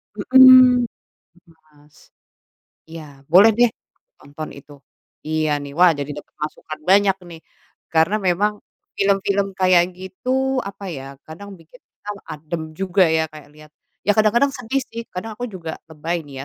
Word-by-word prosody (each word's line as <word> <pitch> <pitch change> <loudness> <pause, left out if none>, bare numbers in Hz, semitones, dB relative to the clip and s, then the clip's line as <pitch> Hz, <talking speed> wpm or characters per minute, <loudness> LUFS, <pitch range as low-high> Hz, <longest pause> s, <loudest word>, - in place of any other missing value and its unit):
Mhm. 255 +1 +7
Gitu - - -75 0.6
Mas. 150 -1 -25 0.9
Iya 165 0 -9 0.3
boleh 200 +5 +8
deh 245 -1 +5 0.5
nonton 150 +2 -9
itu. 145 - -16 0.5
Iya 155 0 -1
nih. 140 - -9
Wah 180 -1 +7
jadi 145 +1 -5
dapat - - -14
masukan 155 0 -6
banyak 195 -1 +4
nih. 165 -1 -11 0.5
Karena 160 +6 +2
memang 195 +2 +1 0.4
film-film 200 0 +1
kayak 185 -2 +4
gitu, 255 +8 -2
apa 200 -2 -9
ya, 135 -3 -7 0.2
kadang 185 +6 -11
bikin 165 +10 -19
kita 205 - -12 0.2
adem 160 +2 -6
juga 190 +1 +2
ya 160 0 +1
kayak 150 -2 -13
lihat 155 0 -16 0.4
ya 205 - +5
kadang-kadang 235 +6 +3
sedih 250 +2 -3
sih, 230 -2 -8
kadang 200 +5 -6
aku 245 - -5
juga 170 -6 -7
lebay 160 +2 -4
nih 135 -1 -8
185 Hz, 145 wpm, -20 LUFS, 155-215 Hz, 0.9 s, boleh